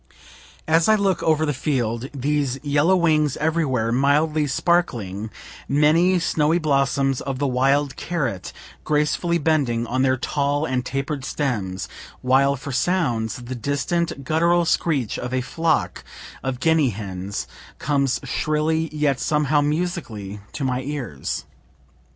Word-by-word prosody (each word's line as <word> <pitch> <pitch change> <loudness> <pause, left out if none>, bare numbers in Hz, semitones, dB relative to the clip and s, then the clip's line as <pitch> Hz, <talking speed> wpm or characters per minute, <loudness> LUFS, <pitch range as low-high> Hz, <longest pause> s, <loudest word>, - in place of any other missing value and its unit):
As 165 +4 +3
I 215 - +7
look 195 -4 +1
over 155 -1 +2
the 150 - 0
field, 125 -3 -1
these 140 -1 -1
yellow 145 +5 +3
wings 155 -5 +2
everywhere 150 -8 0
mildly 150 +4 +2
sparkling, 120 - 0 0.4
many 160 +6 +4
snowy 160 -1 +2
blossoms 135 -3 +1
of 135 -1 -3
the 140 - -1
wild 135 +2 +2
carrot 135 - -3 0.3
gracefully 150 +3 +1
bending 140 -7 +1
on 130 +2 -1
their 130 0 +3
tall 145 +3 0
and 130 -3 -1
taper 135 +3 -3
stems 105 -10 -2 0.3
while 135 +2 +3
for 140 +1 -7
sounds, 125 -8 0
the 125 +2 -5
distant 140 +4 -2
guttural 170 +4 +2
screech 145 -9 0
of 125 +1 -3
a 130 - +1
flock 160 +4 -1 0.4
of 130 -2 -3
guinea 160 -2 +3
hens 100 -2 -5 0.3
comes 140 -3 0
shrilly 155 +1 0
yet 150 -3 0
somehow 150 -1 +2
musically 145 - -3
to 145 - -4
my 130 -1 0
ears. 130 - -4
140 Hz, 130 wpm, -22 LUFS, 125-155 Hz, 0.4 s, I